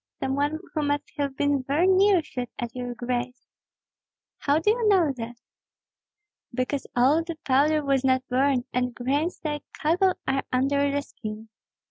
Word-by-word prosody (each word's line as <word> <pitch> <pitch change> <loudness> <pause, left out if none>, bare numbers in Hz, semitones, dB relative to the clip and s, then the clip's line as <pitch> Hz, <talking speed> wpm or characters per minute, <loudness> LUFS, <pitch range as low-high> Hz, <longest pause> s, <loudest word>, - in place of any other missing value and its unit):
some 265 - -1
one 290 +3 0 0.2
who 310 - 0
must 290 0 -1
have 280 -3 -2
been 285 -1 +2
very 285 +7 +1
near 380 -1 +5
shot 250 -4 -5
at 240 -1 -4
your 245 -1 -4
grace." 250 +1 -3 0.9
"How 285 +1 +2
do 325 +7 +3
you 460 -1 +1
know 360 -8 +4
that?" 235 0 -7 1.1
"Because 255 +3 -2
all 275 +7 +4
the 335 0 -5
powder 290 +3 +3
was 275 -1 +2
not 260 -1 +2
burned, 260 0 +2
and 250 -1 -1
grains 285 +7 -1
like 295 -2 -2
cockle 360 +5 +2
are 270 0 +1
under 280 +2 +2
the 285 0 -1
skin. 215 -3 -8
280 Hz, 160 wpm, -26 LUFS, 250-305 Hz, 1.1 s, near